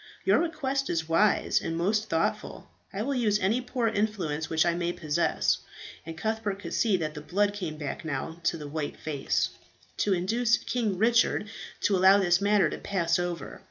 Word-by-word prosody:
"Your - - +4
request 275 -5 -1
is 160 -2 -1
wise 195 +6 +3
and 165 - -3
most 210 +5 0
thoughtful. 165 0 -2 0.2
I 200 +2 -3
will 280 +4 -1
use 220 -5 +2
any 210 +5 +1
poor 245 -1 -1
influence 200 -8 -1
which 160 0 +2
I 170 - +2
may 175 0 -1
possess" 155 0 0 0.5
and 165 0 -7
Cuthbert 220 0 -2
could 200 - -7
see 215 -5 +2
that 155 -3 -3
the 150 - -7
blood 200 +6 0
came 175 -7 -5
back 145 +1 -5
now 160 +2 -4
to 170 - +1
the 150 -2 -7
white 150 0 -4
face 145 -3 -1 0.5
"to 205 - +1
induce 225 +6 +2
King 220 -6 -2
Richard 225 0 +2 0.3
to 200 - +2
allow 190 +2 +6
this 180 -2 +3
matter 205 0 +4
to - - -5
pass 170 -3 0
over. 175 -1 -4
190 Hz, 185 wpm, -28 LUFS, 165-215 Hz, 0.5 s, allow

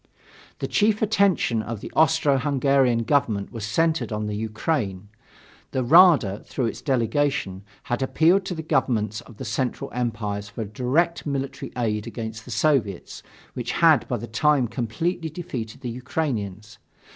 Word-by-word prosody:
The - - -3
chief 215 0 +2
attention 195 - +2
of 115 0 -5
the - - -8
Austro 155 -3 +3
Hungarian 135 -3 +2
government 115 -7 0
was 115 -3 -6
centered 160 +8 0
on 105 0 -2
the 105 0 -3
Ukraine. 110 - -2 0.6
The 130 - 0
Rada, 145 - +6
through 130 - -3
its 115 - -4
delegation, 130 -6 0 0.2
had 120 - -2
appealed 165 +8 +3
to 180 - -3
the 160 - -5
governments 120 - 0
of 115 -2 -15
the 130 - -6
Central 120 +3 -2
Empires 105 -4 -3
for 115 0 -5
direct 135 - 0
military 140 -1 -4
aid 110 -2 -1
against 110 -1 -6
the - - -11
Soviets, 115 - 0 0.3
which - - -4
had - - +4
by - - -1
that - - -9
time 145 -1 +3
completely 160 +9 -2
defeated 135 -9 -6
the 120 - -4
Ukrainians. 110 - -4
125 Hz, 150 wpm, -24 LUFS, 110-150 Hz, 0.6 s, Rada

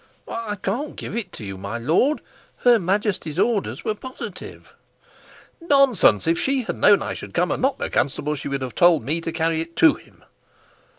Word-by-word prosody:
"I 225 -2 -4
can't 225 +10 -3
give - - -6
it 210 -6 -5
you, 95 -4 -7
my 100 +4 -5
lord. 165 - +1 0.4
Her 240 -2 +6
Majesty's 190 -4 -1
orders 215 0 0
were 215 - 0
positive." 255 +4 -9 0.9
"Nonsense! 275 - +4
If 165 +1 +2
she 270 -1 +1
had - - -4
known 205 -1 +5
I - - -3
should - - -9
come 180 +1 +1
and - - -2
not 270 +1 +1
the - - -3
constable, 145 +3 -1
she 145 - -6
would 140 -1 -3
have 125 - -5
told 175 -6 +4
me 155 +7 0
to 165 - -4
carry 160 0 0
it 165 +1 -8
to 315 -3 +6
him." - - -17
180 Hz, 185 wpm, -22 LUFS, 150-235 Hz, 0.9 s, Her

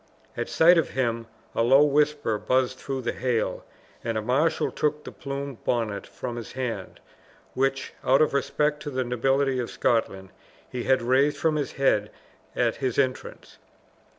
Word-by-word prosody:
At - - -3
sight 170 +1 +6
of 165 - -1
him 115 -3 -1 0.3
a - - 0
low 135 +5 +6
whisper 145 -6 +1
buzzed 130 +1 0
through 135 -2 -4
the 120 - 0
hail, 125 -3 -1 0.4
and 115 -1 -2
a - - 0
marshal 150 +7 +1
took 150 0 -1
the - - -8
plumed 140 -2 -6
bonnet 110 -4 -1
from 120 -2 -6
his 115 -4 -7
hand, 125 -2 -4 0.5
which, 135 0 -1
out 135 +1 +4
of 155 - +3
respect 150 +2 0
to 150 - -5
the 130 -2 -1
nobility 135 +2 +1
of 120 - -3
Scotland, 95 -5 0 0.4
he 125 -1 -5
had 130 -2 +3
raised 135 +4 +3
from 160 -2 +1
his 145 -2 -2
head 105 -6 +2 0.5
at - - +1
his 130 -4 -2
entrance. 130 -2 -2
130 Hz, 165 wpm, -26 LUFS, 120-140 Hz, 0.5 s, sight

